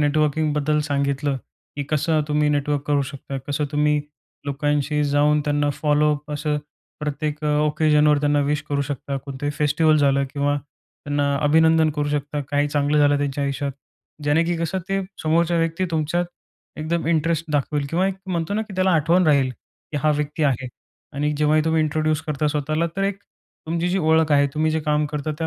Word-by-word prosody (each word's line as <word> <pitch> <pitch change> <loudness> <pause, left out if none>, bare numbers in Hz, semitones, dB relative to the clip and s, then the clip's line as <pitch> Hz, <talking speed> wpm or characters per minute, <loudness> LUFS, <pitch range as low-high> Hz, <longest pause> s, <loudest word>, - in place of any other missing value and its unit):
नेटवर्किंगबद्दल 150 0 +1
सांगितलं, 140 0 0 0.4
की 145 - -2
कसं 155 +1 +1
तुम्ही 150 0 +2
नेटवर्क 145 -1 0
करू 145 -1 +2
शकता, 135 -1 -6
कसं 145 0 -1
तुम्ही 150 0 +2 0.5
लोकांशी 145 +1 0
जाऊन 145 +1 +3
त्यांना 145 -1 +1
फॉलोअप 150 0 +1
असं 150 0 -1 0.4
प्रत्येक 150 0 -3
ओकेजनवर 150 0 +3
त्यांना 145 0 +2
विश 145 +1 0
करू 145 -1 0
शकता. 140 0 -4
कोणतंही 135 +1 -4
फेस्टिव्हल 155 +1 +3
झालं 140 -2 +3
किंवा 145 0 0
त्यांना 145 0 -4
अभिनंदन 160 +1 +4
करू 145 0 0
शकता 145 0 -2
काही 145 0 +1
चांगलं 145 +1 +1
झालं 145 0 +4
त्यांच्या 145 0 -1
आयुष्यात 140 0 -2 0.5
जेणे, 150 +3 +3
की 170 0 -1
कसं 165 +3 -2
ते 195 0 0 0.2
समोरच्या 170 +2 +2
व्यक्ती 165 +3 0
तुमच्यात 160 +2 0 0.5
एकदम 165 +2 -2
इंटरेस्ट 165 0 +1
दाखवेल 145 0 0
किंवा 180 +3 +1
एक 195 - -1
म्हणतो 175 0 -2
ना, 220 - 0
की 210 -3 -10
त्याला 185 0 +2
आठवण 170 +2 +3
राहील, 140 -4 +3
की 130 +4 -12
हा 155 - +3
व्यक्ती 150 +1 -2
आहे. 135 -3 +1 0.5
आणि 150 +1 -1
जेव्हाही 150 +1 +3
तुम्ही 160 0 +2
इंट्रोड्यूस 155 0 0
करता 150 0 -2
स्वतःला 155 +3 0
तर 195 - 0
एक 200 0 -1 0.5
तुमची 170 +2 -1
जी 190 +2 +1
ओळख 160 -1 +3
आहे, 145 0 +5
तुम्ही 155 +1 +1
जे 160 0 0
काम 150 0 +1
करता 150 +1 -3
त्या 165 - -1
150 Hz, 170 wpm, -22 LUFS, 145-160 Hz, 0.5 s, आहे